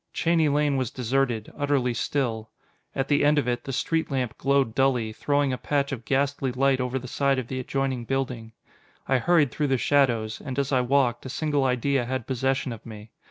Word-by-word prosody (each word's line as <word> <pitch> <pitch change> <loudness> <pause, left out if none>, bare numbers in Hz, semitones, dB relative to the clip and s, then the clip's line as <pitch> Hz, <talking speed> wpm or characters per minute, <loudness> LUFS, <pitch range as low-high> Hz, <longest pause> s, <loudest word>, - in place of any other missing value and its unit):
Cheney 165 -2 +2
Lane 145 -1 +2
was 130 -4 -1
deserted, 125 -2 -1
utterly 140 -4 +1
still. 115 -3 -2 0.5
At 135 0 -1
the 145 0 +2
end 150 +1 +4
of 145 - +1
it, 120 0 -1
the 135 - -4
street 160 +5 -1
lamp 130 -4 -2
glowed 140 -4 +1
dully, 125 -4 +1
throwing 145 +2 0
a 125 - -4
patch 140 -1 0
of 120 -4 -5
ghastly 135 +1 0
light 135 +1 +2
over 125 +1 -1
the 130 0 -6
side 140 +1 +1
of 125 -2 -4
the 130 - -3
adjoining 130 -1 -2
building. 125 -3 -3 0.5
I 135 -1 +3
hurried 150 -1 +3
through 150 - -1
the 135 -1 +2
shadows, 120 -4 +1
and 130 -3 -5
as 140 0 0
I 130 -2 +3
walked, 125 -1 +1
a - - -7
single 145 0 0
idea 130 0 +1
had 130 -1 -3
possession 130 0 -1
of 115 - -11
me. 110 -1 -11
135 Hz, 205 wpm, -25 LUFS, 125-140 Hz, 0.5 s, end